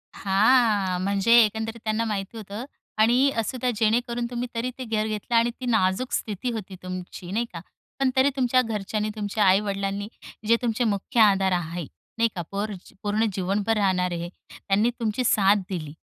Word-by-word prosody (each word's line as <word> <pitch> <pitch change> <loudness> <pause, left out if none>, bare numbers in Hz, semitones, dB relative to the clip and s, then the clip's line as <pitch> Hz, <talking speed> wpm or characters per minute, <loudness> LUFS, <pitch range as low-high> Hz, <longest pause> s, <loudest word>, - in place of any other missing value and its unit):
हां. 200 -2 +3
म्हणजे 200 +3 +2
एकंदरीत 220 +2 -2
त्यांना 220 +1 0
माहिती 210 +1 -4
होतं. 210 +3 -7 0.3
आणि 245 +5 +5
असं 225 +3 -1
का 250 - +1
जेणेकरून 235 +2 +1
तुम्ही 245 0 -3
तरी 235 +2 -1
ते 260 - -5
घर 215 -1 0
घेतलं 215 +2 -3
आणि 230 +1 +4
ती 255 - -5
नाजूक 220 +1 +1
स्थिती 220 +3 -2
होती 205 -4 -6
तुमची, 185 0 -7
नाही 230 +4 0
का. 170 - -5 0.4
पण 270 - +3
तरी 265 +2 +4
तुमच्या 255 -1 +3
घरच्यांनी, 215 -1 -2
तुमच्या 210 0 -1
आई-वडिलांनी 200 +1 +1 0.4
जे 230 - +6
तुमचे 235 0 0
मुख्य 210 +1 -1
आधार 195 -3 +4
आहे, 175 -2 -2 0.3
नाही 230 0 +3
का. 175 - -2
पोर 205 +1 -2 0.3
पूर्ण 210 +2 +1
जीवनभर 200 +4 0
राहणारे, 180 -3 0 0.3
त्यांनी 205 +4 +1
तुमची 230 +2 -1
साथ 200 -3 +4
दिली. 155 -6 -5
215 Hz, 165 wpm, -25 LUFS, 195-230 Hz, 0.4 s, जे